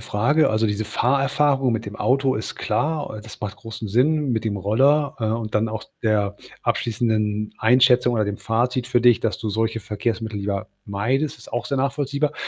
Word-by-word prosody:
Frage. 125 +10 +2
Also, 110 +1 +1
diese 105 +1 -1
Fahrerfahrung 135 +3 +2
mit 115 0 -2
dem 100 - -6
Auto 135 0 +2
ist 110 - -4
klar, 150 -6 -1
äh, - - -7
das 110 +1 -12
macht 105 -1 -5
großen 115 -1 -7
Sinn 140 +7 +2
mit 115 0 -1
dem 105 -2 -1
Roller, 135 - +2
äh, - - -1
und 110 0 -2
dann 110 +1 +2
auch 110 -1 -5 0.2
der 105 -3 +1 0.3
abschließenden 110 -2 0
Einschätzung 125 +1 +4
oder 110 -2 +1
dem 105 -1 -4
Fazit 125 +2 0
für 120 - +2
dich, 120 -1 +5
dass 110 -4 -1
du 110 -1 -3
solche 115 +2 0
Verkehrsmittel 110 +1 -3
lieber 100 -1 -3 0.2
meidest, 125 +9 -1
ist - - -14
auch 120 0 -2
sehr 140 - -1
nachvollziehbar. 140 +2 0
115 Hz, 190 wpm, -22 LUFS, 105-130 Hz, 0.3 s, dich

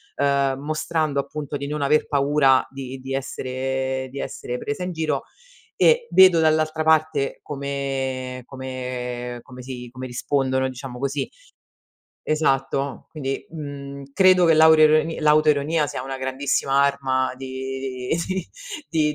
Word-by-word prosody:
ehm, 140 -1 +1
mostrando 155 0 -1
appunto 145 +1 -4
di 140 - -5
non 150 0 -3
aver 145 +2 +2
paura 140 -2 +3
di 135 -1 -7
di 135 +1 -6
essere, 130 0 -2
di 140 - -6
essere 125 -2 -4
presa 145 +5 -4
in 180 - -3
giro 160 -2 -1 0.6
e 475 0 +5
vedo 185 -3 +7
dall'altra 155 0 +2
parte 155 -3 +2
come 135 -3 -3
come 125 -2 -5
come 125 0 -11
si 125 -1 -7
come 130 +1 -7
rispondono 130 +1 0
diciamo 130 -1 -8
così 140 +1 -1 1.0
Esatto. 140 -2 0
Quindi, 135 -3 -4
uhm, 140 -3 -7
credo 185 0 +5
che 165 - +6
l'auro 160 0 +7 0.4
l'autoironia 150 0 +3
sia 125 -2 -5
una 135 +1 -5
grandissima 135 +1 0
arma 130 -2 +1
di 130 -1 -5 0.2
di 190 -2 -2 0.4
di 155 -2 +2
140 Hz, 130 wpm, -23 LUFS, 130-150 Hz, 1.0 s, vedo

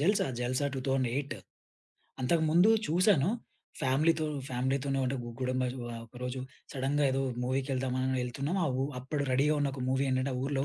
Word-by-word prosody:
జల్సా, 195 +7 +3 0.2
జల్సా 130 +3 0
2008 135 0 0 0.9
అంతకుముందు 160 +7 +4 0.2
చూసాను. 175 -2 +4 0.5
ఫ్యామిలీ‌తో 155 +4 +2 0.2
ఫ్యామిలీ‌తోనే 135 +2 0
అంటే 135 +2 -1
గు 120 - -6
గుడుంబా 130 0 0 0.2
ఒ 120 - -5
ఆహ్, 115 - -6
ఒకరోజు 125 +2 -5 0.3
సడెన్‌గా 140 +2 +1
ఏదో 135 0 +1 0.2
మూవీకెళ్దామని 130 0 0
ఎళ్తున్నాం 140 +9 -2
అవు 130 -1 0 0.2
అప్పుడు 140 +3 -2
రెడీగా 145 +4 +3
ఉన్న 140 -1 +1
ఒక 130 - -5
మూవీ 130 +1 +2
ఏంటంటే 130 +1 +1
ఆ - - -2
ఊరిలో, 135 -1 0
135 Hz, 145 wpm, -31 LUFS, 130-145 Hz, 0.9 s, అంతకుముందు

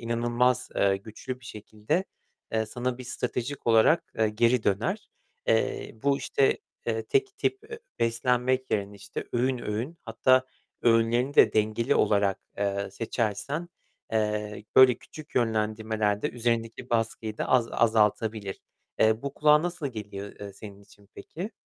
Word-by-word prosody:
inanılmaz, 120 +2 +1
eee, 100 -1 +3
güçlü 115 +5 -8
bir - - -17
şekilde, 110 - -3 0.5
eee, 110 -1 +1
sana 120 +3 -3
bir 125 - -8
stratejik 125 +2 -4
olarak, 115 +9 +4
eee, 110 -1 +3
geri 115 +2 +2
döner. 185 - 0 0.4
Eee, 110 - +1
bu 140 0 +2
işte, 135 - +2 0.3
eee, 110 -1 0
tek 400 -1 0
tip, 395 - 0
eee, 455 - -6 0.2
beslenmek 125 +2 +1
yerine 100 0 -1
işte 100 +1 -6
öğün 125 +1 +1
öğün 120 +9 -4
hatta 130 +3 +3 0.4
öğünlerini 120 +4 +3
de - - +6
dengeli, 110 +2 +1
olarak, 100 -2 +2 0.2
eee, 100 -1 -1
seçersen, 115 - -2 0.4
eee, 105 -1 -1
böyle 130 -2 +9
küçük 155 -1 -13
yönlendirmelerde 110 -2 0
üzerindeki 115 0 -2
baskıyı 115 -1 -1
da - - -2
az 125 -3 +3
azaltabilir. 110 -2 +1 0.4
Eee, 110 +1 +3
bu 140 0 -4
kulağa 150 +1 +5
nasıl 175 -3 -3
geliyor, 100 -3 -7
eee, 100 -1 -7
senin 100 0 -11
için 100 0 -21
peki? 185 +7 -7
115 Hz, 140 wpm, -27 LUFS, 105-130 Hz, 0.5 s, böyle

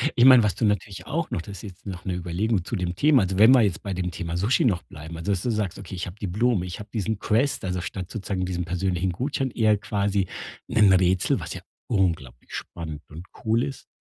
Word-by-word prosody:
Ich 120 - +4
meine, 130 -2 +9
was 105 -5 +1
du - - -3
natürlich 100 -2 -1
auch 165 +3 -2
noch - - -2
das 100 +2 -9
ist - - -11
jetzt 95 -2 -11
noch 95 -2 -7
'ne 95 - -1
Überlegung 90 +3 -1
zu 110 - -3
dem 90 -1 -2
Thema, 140 - +5
also, 95 0 -2
wenn 110 +6 +8
wir 130 - +6
jetzt 100 -2 0
bei 100 - -3
dem 90 -1 -2
Thema 85 0 -4
Sushi 105 +8 +2
noch 95 -8 +2
bleiben, 80 +1 -9
also, 85 +5 -1
dass 95 - -2
du - - 0
sagst: 105 -5 -2
„Okay, 100 -1 -8
habe 90 +1 -5
die 100 - -2
Blumen, 105 +1 +1
ich 90 -1 -6
hab 105 0 -9
diesen 110 -1 -2
Quest“, 115 +2 +1
also 90 -1 -2
statt 90 0 -5
sozusagen 95 -3 -3
diesen 90 -1 -2
persönlichen 90 +1 -1
Gutschein, 130 - -2
eher 110 -3 +3
quasi 100 -2 0 0.4
'nen 105 -5 +5
Rätsel, 95 0 +3
was - - -5
ja - - -7 0.3
unglaublich 80 - -1
spannend 80 -3 -6
und 80 +3 -9 0.2
cool 115 +2 +2
ist. 135 - -6
95 Hz, 235 wpm, -25 LUFS, 90-110 Hz, 0.4 s, meine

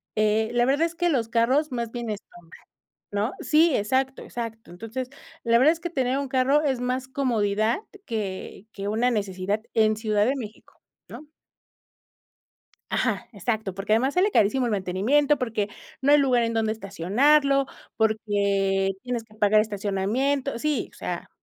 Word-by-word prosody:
Eh, 215 +1 +2
la 240 0 +3
verdad 285 +5 +2
es 335 - -4
que 350 +1 0
los 240 -7 +1
carros 260 +6 +2
más 235 -2 -3
bien 240 -2 -4
estorban 175 -5 -10 0.6
¿no? 205 +5 -1
Sí, 315 -1 +4
exacto, 260 +6 0
exacto. 225 -3 -7
Entonces, 225 +7 -6 0.3
la 230 0 +4
verdad 285 +6 +6
es 330 - -10
que 345 - -3
tener 265 -4 0
un 280 - -3
carro 265 +3 +3
es 265 -4 0
más 255 +1 -2
comodidad 225 - 0 0.3
que 210 -3 -5
que 200 0 -5
una 230 +4 +1
necesidad 200 -1 -2
en 215 -1 +3
Ciudad 215 -2 +1
de 265 +4 +1
México, 215 -4 -10 0.3
¿no? 305 - -10 1.6
Ajá, 235 -1 -1
exacto. 210 -1 -2
Porque 195 +2 -2
además 260 +5 +1
sale 380 +3 +3
carísimo 245 - +2
el - - -1
mantenimiento, 215 +10 +2
porque 225 -4 -2 0.3
no 280 +2 +3
hay 295 - +7
lugar 255 -4 +3
en 230 0 -1
donde 220 -1 +1
estacionarlo, 270 - +2 0.3
porque 200 -3 +1
tienes 245 -2 -3
que 215 -1 -21
pagar 215 0 +4
estacionamiento, 220 +7 -1
sí, 300 +3 -1
o - - -18
sea, - - -5
230 Hz, 160 wpm, -25 LUFS, 210-265 Hz, 1.6 s, hay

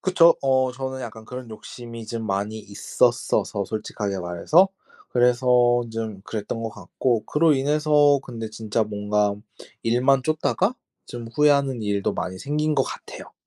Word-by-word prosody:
그쵸. 170 -3 +5
어 130 -1 +2
저는 130 0 -5
약간 110 -2 -8
그런 125 -1 -8
욕심이 115 +1 -9
좀 115 -1 -4
많이 100 +2 -2
있었어서 100 0 0
솔직하게 105 -1 -4
말해서. 90 - +3 0.4
그래서 120 0 +4
좀 110 -3 -4
그랬던 110 +2 -4
거 115 - -2
같고 115 +1 -2
그로 155 0 +3
인해서 145 0 +3
근데 115 -3 -7
진짜 110 0 -1
뭔가 105 0 0 0.5
일만 125 +3 +3
쫓다가 160 - 0 0.3
좀 120 -1 -7
후회하는 140 -1 +2
일도 100 -2 0
많이 95 0 -4
생긴 150 +5 -1
거 - - +4
같아요. - - -9
120 Hz, 300 characters per minute, -24 LUFS, 110-140 Hz, 0.5 s, 그쵸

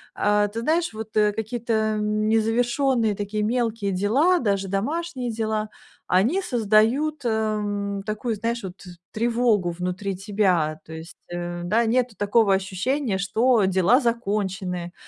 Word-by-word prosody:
э, 205 0 +2
ты 230 - -3
знаешь, 325 0 0
вот, 220 0 -8
э, 210 -1 +3
какие-то, 230 +2 -3
эм, 215 0 0
незавершённые, 235 +1 +1
такие, 210 +1 -3
мелкие 225 -3 -1
дела, 265 - +2
даже 200 -3 0
домашние 255 - -2
дела, 215 -1 -2 0.4
они 230 - +2
создают, 245 - +2
эм, 210 -3 -1
такую, 215 +2 -3
знаешь, 230 +2 -3
вот, 185 0 -8 0.3
тревогу 230 -5 +1
внутри 180 +3 -3
тебя. 185 -6 0
То 160 - -10
есть, 160 +2 -10
э, 175 0 -5
да, 225 +6 +2
нету 240 -1 +1
такого 205 0 +3
ощущения, 195 +5 -1
что 220 +3 +2
дела 190 +7 +4
закончены. 195 -7 -2
215 Hz, 130 wpm, -24 LUFS, 195-235 Hz, 0.4 s, дела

